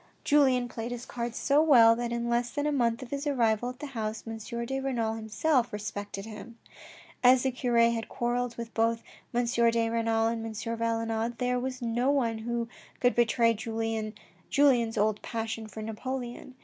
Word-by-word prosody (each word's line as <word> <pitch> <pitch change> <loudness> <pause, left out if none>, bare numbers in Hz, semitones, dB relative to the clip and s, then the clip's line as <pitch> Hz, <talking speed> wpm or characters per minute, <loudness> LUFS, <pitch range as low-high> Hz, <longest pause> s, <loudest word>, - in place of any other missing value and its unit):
Julien 260 -4 +4
played 230 0 -5
his 245 0 -5
cards 235 -1 -4
so 285 +2 +3
well, 235 -8 +7
that 240 0 -3
in 235 0 -2
less 240 0 +1
than 290 +3 -2
a 300 - +1
month 240 -3 +1
of 240 - -11
his 280 +1 -3
arrival 240 -4 +1
at 250 - -8
the 295 - -6
house, 220 -5 -4
M. 225 0 -5 0.3
de 270 +3 -2
Renal 240 -5 -1
himself 235 +3 0
respected 205 -1 -5
him. 225 +2 -10 0.7
As 250 0 +6
the 265 - +1
cure 245 -1 -1
had 230 -1 +3
quarrelled 240 0 -1
with 235 -1 -6
both 230 0 +1 0.3
M. 245 0 +1
de 230 -1 +2
Renal 225 -1 +1
and 225 0 -1
M. 225 -1 -5
Valenod, 230 +1 -2
there 250 0 0
was 255 0 -4
no 240 +3 +1
one 235 -6 +1
who 235 +1 -2 0.3
could 245 0 +3
betray 235 0 +3
Julien's 225 +3 0
old 210 0 +1
passion 225 -1 -4
for 215 0 -8
Napoleon. 245 +3 -5
235 Hz, 175 wpm, -29 LUFS, 225-250 Hz, 0.7 s, well